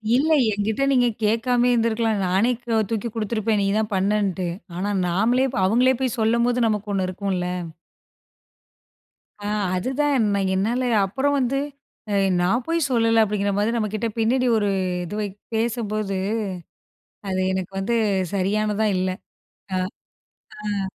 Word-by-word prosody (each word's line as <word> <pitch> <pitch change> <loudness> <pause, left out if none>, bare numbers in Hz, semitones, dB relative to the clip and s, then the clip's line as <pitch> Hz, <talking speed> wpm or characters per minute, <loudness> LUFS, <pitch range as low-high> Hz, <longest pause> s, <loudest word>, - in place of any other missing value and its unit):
இல்ல. 285 +5 +2 0.2
என்கிட்ட 210 +5 -1
நீங்க 250 -2 +4 0.2
கேட்காமயே 240 +3 +2
இருந்துருக்கலாம். 225 -2 +1
நானே 195 +7 +2
க 230 -2 +1
தூக்கி 225 0 -2
குடுத்துருப்பேன் 215 -1 0
நீ - - +1
தான் 215 0 -1
பண்ணன்ட்டு. 195 -2 0 0.3
ஆனா 195 +4 -2 0.2
நாமளே 230 +9 +2
ப்ப - - -1
அவுங்களே 250 +6 +3
போய் 255 -2 -1
சொல்லும்போது, 235 +2 +2
நமக்கு 210 -1 -2
ஒண்ணு 190 -2 0
இருக்கும்ல! 185 -1 -2 2.0
ஆ - - -1 0.3
அதுதான், 265 +5 +1
நான் 195 -1 0
என்னால 225 +7 0 0.2
அப்புறம் 270 +9 0
வந்து 265 +1 0 0.8
"நான் 195 +8 +1
போய் 330 -3 +1
சொல்லலை" 230 -2 +3
அப்படிங்கிற 205 -1 0
மாதிரி 215 +3 +1
நம்மகிட்ட 215 0 -1
பின்னாடி 250 +3 +2
ஒரு 205 -2 +1 0.3
இது 175 +4 -6
வை 210 - -1 0.3
பேசும்போது, 215 -3 -1 1.1
அது 185 -1 -1
எனக்கு 190 0 -3
வந்து 235 +5 0 0.4
சரியானதா 210 +2 +1
இல்ல. 185 0 0 1.7
அ, - - -2
ஆ. - - -2
220 Hz, 130 wpm, -23 LUFS, 200-240 Hz, 2.0 s, நீங்க